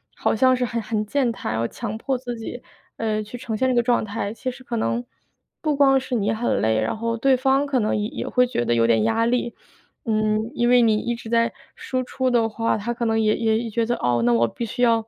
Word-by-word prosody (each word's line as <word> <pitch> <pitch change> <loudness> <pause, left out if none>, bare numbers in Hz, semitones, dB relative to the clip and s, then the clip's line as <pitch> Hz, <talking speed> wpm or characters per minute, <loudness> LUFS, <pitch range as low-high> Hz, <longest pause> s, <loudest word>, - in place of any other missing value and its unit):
好 - - 0
像 255 +3 +4
是 250 - -1
很 235 -1 -2
很 215 0 -2
健 260 +3 +1
谈， 170 - -4
要 115 +1 0
强 220 - -5
迫 260 +3 -1
自 245 -1 -6
己， 235 +2 -7 0.4
呃， 215 -1 -1
去 210 +3 -8
呈 230 -2 -4
现 260 - +1
这 255 - +1
个 240 - +3
状 240 0 +2
态， 205 0 -4
其 255 +3 -4
实 255 +1 -9
可 245 - -4
能 235 +2 -1 0.6
不 305 -2 0
光 270 -1 +5
是 255 -1 -4
你 210 -2 +1
很 230 +2 0
累， 110 0 +2
然 110 - -2
后 230 +1 -1
对 265 +3 +3
方 270 +2 +2
可 270 -2 +1
能 215 -2 0
也 210 0 -1
也 - - -5
会 250 0 +3
觉 240 - -1
得 120 - +1
有 115 -1 +3
点 115 -2 +3
压 225 0 +2
力。 240 0 -1 0.5
嗯， 215 0 0
因 240 - +1
为 245 0 +6
你 225 -2 +4
一 240 +2 -2
直 230 -1 -10
在 230 0 +2 0.2
输 255 -1 -3
出 260 +1 -1
的 235 -2 +3
话， 225 +1 0
他 215 +3 -3
可 235 0 -3
能 225 0 +1
也 215 0 +3
也 225 0 0
觉 230 +1 0
得， 240 +1 0
哦， 120 -1 +1
那 120 - +4
我 115 0 +3
必 235 - -5
须 230 - -5
要， 230 -2 +3
230 Hz, 275 characters per minute, -23 LUFS, 215-245 Hz, 0.6 s, 为